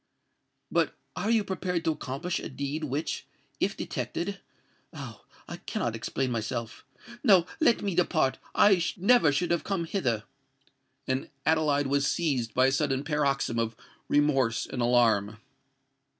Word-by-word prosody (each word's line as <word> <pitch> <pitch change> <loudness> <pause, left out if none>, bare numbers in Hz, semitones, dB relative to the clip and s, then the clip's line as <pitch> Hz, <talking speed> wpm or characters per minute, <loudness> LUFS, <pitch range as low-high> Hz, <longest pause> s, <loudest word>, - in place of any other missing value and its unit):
"But - - +1 0.2
are 210 - -2
you 225 -2 +3
prepared 185 -3 -2
to 160 - +3
accomplish 155 +4 -3
a - - -6
deed 145 +3 -3
which, 145 +3 -3 0.3
if - - 0
detected——Oh! 195 +2 -7 0.2
I - - -6
cannot 115 -1 -3
explain 125 +3 -2
myself! 115 0 -4 0.4
No:—let 205 - +4
me 200 -2 -1
depart—I 175 +3 +2
never 195 -4 +5
should 175 +5 0
have 170 - +1
come 190 -4 -1
hither!" 125 - -1 0.8
And 130 0 -2 0.2
Adeline 150 -2 +2
was 140 +1 +2
seized 130 -10 0
by 130 - +5
a 135 - +4
sudden 135 -1 0
paroxysm 140 -5 0
of 115 -1 -1 0.3
remorse 135 -5 +2
and 125 - -4
alarm. 115 -4 +3
145 Hz, 130 wpm, -28 LUFS, 125-175 Hz, 0.8 s, never